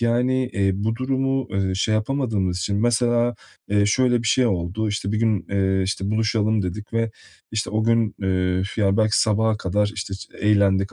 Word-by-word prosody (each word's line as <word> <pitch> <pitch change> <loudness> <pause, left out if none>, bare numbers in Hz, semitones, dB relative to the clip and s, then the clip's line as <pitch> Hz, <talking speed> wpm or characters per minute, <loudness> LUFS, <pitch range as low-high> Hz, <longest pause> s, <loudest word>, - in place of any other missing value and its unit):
yani, 125 +2 +1
eee, 100 -1 +1
bu 110 +3 -2
durumu, 135 0 -1
eee, 95 -1 -1
şey 110 +3 0
yapamadığımız 110 -6 -1
için, 100 +3 -1
mesela, 120 +1 +2 0.3
eee, 100 0 +2
şöyle 120 +1 +2
bir 115 - -4
şey 130 -2 +3
oldu: 95 +2 -1
İşte, 100 0 -2
bir 110 - 0
gün, 110 -4 +1
eee, 95 -1 +1
işte, 95 +1 -2
buluşalım, 110 -1 +1
dedik 105 +5 -6
ve, 115 0 0 0.4
işte, 110 - -2
o 110 +1 0
gün, 115 -2 +2
eee, 95 -1 0
f - - -3
ya, 100 +1 +2
belki 110 -1 +3
sabaha 110 0 +2
kadar, 105 +1 0
işte, 95 0 -5
ç 95 - -9
eğlendik, 100 -2 +2
105 Hz, 185 wpm, -22 LUFS, 95-115 Hz, 0.4 s, şey